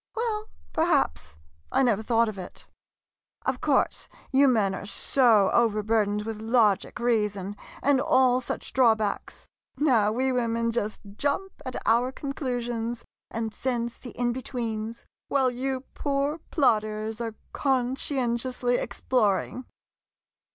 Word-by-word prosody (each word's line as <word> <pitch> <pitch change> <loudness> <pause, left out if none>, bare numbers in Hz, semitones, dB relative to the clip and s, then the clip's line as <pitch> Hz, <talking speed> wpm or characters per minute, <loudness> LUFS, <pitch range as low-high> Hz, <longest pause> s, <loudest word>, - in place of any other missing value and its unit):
Well 440 -2 -2
— - - -29
perhaps, 300 - +1 0.3
I 270 - +3
never 225 -5 +2
thought 230 +1 +2
of 210 -3 -5
it. 180 - -9 0.8
Of - - -1
course, - - +1 0.2
you 275 +1 +5
men 215 -6 +3
are 200 - -6
so 220 -1 +3
overbur 220 -2 +2
dened 210 +1 -2
with 220 -1 -4
logic, 220 -3 +2
reason, 210 -4 0 0.3
and 280 -1 +4
all 255 -1 +4
such - - -5
draw 245 -4 +5
backs. 215 -2 -4 0.3
Now 235 -8 +3
we 260 +4 +1
women 230 -2 0
just 215 -2 -2 0.2
jump 295 +7 -1 0.2
at 255 - -5
our 240 +3 +3
conclusions 240 -5 -3 0.2
and 225 -1 -3
sense 240 -2 -2
the 250 - -9
in 240 -1 +1
betweens, 230 -3 -4 0.2
while 265 -2 +2
you 260 +1 -2
poor 285 +2 -1
plodders 215 -5 +1
are 225 -2 -4 0.2
conscientiously 250 -2 0
ex - - -6
ploring! 245 +1 +1
240 Hz, 130 wpm, -27 LUFS, 220-260 Hz, 0.8 s, you